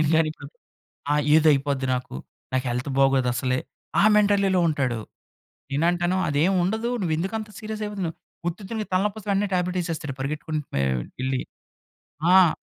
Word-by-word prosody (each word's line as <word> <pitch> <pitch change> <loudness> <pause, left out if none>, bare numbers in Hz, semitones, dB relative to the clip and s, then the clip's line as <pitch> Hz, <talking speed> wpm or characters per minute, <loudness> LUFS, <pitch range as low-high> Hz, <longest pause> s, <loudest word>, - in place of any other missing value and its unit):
నేను 155 - +2
గాని 160 -1 +3
ఇప్పుడు 140 - -11 0.7
ఆ! - - +4 0.2
ఏదో 160 0 +6
అయిపోద్ది 140 -1 0
నాకు. 125 - -5 0.4
నాకు 130 0 0
హెల్త్ 125 +4 -2
బాగోదు 135 -2 +4
అసలే, 130 0 0 0.4
ఆ - - +5
మెంటాలిటీలో 200 -3 +3
ఉంటాడు. 130 -7 0 0.7
నేను 145 +4 +1
అంటాను 175 +1 0
అదేం 155 +6 +2
ఉండదు. 220 +5 -1
నువ్వెందుకు 175 +5 -1
అంత 215 -1 -7
సీరియస్ 215 0 -5
అయిపోతున్నావు? 195 -6 -4 0.3
ఉత్తిత్తునికి 205 +5 -4
తలనొప్పిస్తే 205 +2 0
వెంటనే 200 +1 +1
టాబ్లెట్ 180 0 0
ఏసేస్తాడు 155 -5 -4
పరిగెత్తుకుంటూ 150 +1 -3
వె 70 - +2 0.4
ఎళ్లి. 130 -1 0 0.9
ఆ! 185 -4 +6
165 Hz, 145 wpm, -24 LUFS, 140-195 Hz, 0.9 s, ఏదో